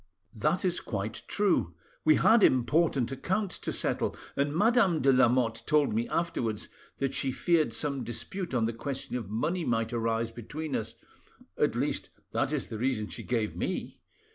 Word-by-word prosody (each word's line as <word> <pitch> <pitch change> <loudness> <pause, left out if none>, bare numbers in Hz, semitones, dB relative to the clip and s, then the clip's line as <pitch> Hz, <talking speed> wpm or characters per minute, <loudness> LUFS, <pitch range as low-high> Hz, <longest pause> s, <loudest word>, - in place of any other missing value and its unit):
"That 150 - 0
is 180 -1 +1
quite 110 0 -4
true. 185 - +1 0.3
We 155 -1 +6
had 225 0 +5
important 130 -2 +3
accounts 190 +9 -2
to - - -3
settle, - - -1 0.2
and 140 +1 +1
Madame 205 - +4
de 135 0 +5
Lamotte 120 -2 +3
told 150 -6 +3
me 115 +2 -1
afterwards 115 -11 -1 0.3
that 135 -1 -1
she 135 - 0
feared 160 -2 +2
some 135 +3 -1
dispute 175 - -4
on 115 -2 +2
the 115 - -1
question 130 +2 -4
of 115 -6 -4
money 165 - -1
might 115 -3 0
arise 115 0 0
between 150 +6 -5
us—at 110 0 -4
least, - - -1 0.2
that - - 0
is - - -2
the 110 - -5
reason 120 -4 0
she - - -6
gave 115 -4 -1
me. - - -3
130 Hz, 165 wpm, -29 LUFS, 115-160 Hz, 0.3 s, We